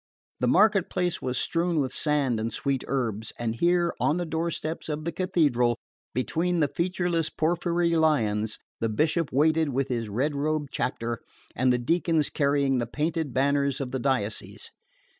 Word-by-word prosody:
The 125 - +1
market 195 - +4
place 180 -2 -1
was 125 0 -2
strewn 170 -1 0
with 130 -3 -1
sand 145 -6 +1
and 115 +1 -2
sweet 135 +2 -1
herbs; 110 -5 -2
and 115 -2 -2
here, 175 +3 +2
on 155 - +2
the 175 - -1
doorsteps 160 0 -3
of 155 0 -3
the 170 - -1
Cathedral, 145 -11 +2 0.4
between 170 +7 0
the 150 - +3
featureless 175 -2 0
porphyry 170 +1 0
lions, 110 -10 +1 0.2
the 115 - 0
Bishop 155 +7 +1
waited 155 +3 +3
with 135 0 -1
his 115 -3 -2
red 130 +9 0
robed 150 0 -1
chapter, 115 -2 -2 0.4
and 130 +1 +3
the 125 - +3
deacons 160 +4 +1
carrying 140 -2 +2
the 120 - -2
painted 155 +2 -2
banners 140 +1 +1
of 130 -3 -4
the 130 - -2
diocese. 120 -5 -2
145 Hz, 160 wpm, -27 LUFS, 125-165 Hz, 0.4 s, market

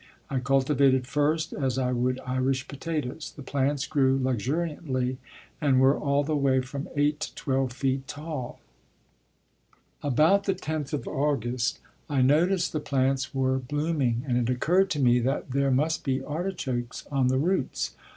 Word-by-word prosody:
I 135 - +1
cultivated 135 0 +3
first 150 +4 0
as 130 -3 -1
I 125 -1 +1
would 125 +1 0
Irish 130 +1 0
potatoes. 150 0 -4
The 145 - -9
plants 140 +1 0
grew 135 -3 +2
luxuriantly 130 0 -1 0.4
and 135 -4 +3
were 135 +1 +5
all 140 0 +1
the 155 +1 -1
way 135 -2 +3
from 140 +2 -6
8 145 +1 +2
to - - -5
12 135 -2 -1
feet 135 +1 -1
tall. 145 -3 -6 1.4
About 155 +9 +3
the 195 - +1
10th 155 -5 -4
of 150 - -3
August 125 -4 -1 0.3
I 135 -3 +2
noticed 170 +7 +3
the 155 - 0
plants 135 -1 0
were 130 0 +1
blooming 140 -3 -1
and 125 -1 +2
it 120 +1 0
occurred 180 +10 +2
to 150 - -1
me 125 -2 +4
that 130 +2 -1
there 140 +1 +2
must 150 +5 +1
be 135 -1 -1
artichokes 145 -7 -3
on 135 -3 +2
the 130 +1 +2
roots. 160 0 0
135 Hz, 155 wpm, -27 LUFS, 130-150 Hz, 1.4 s, were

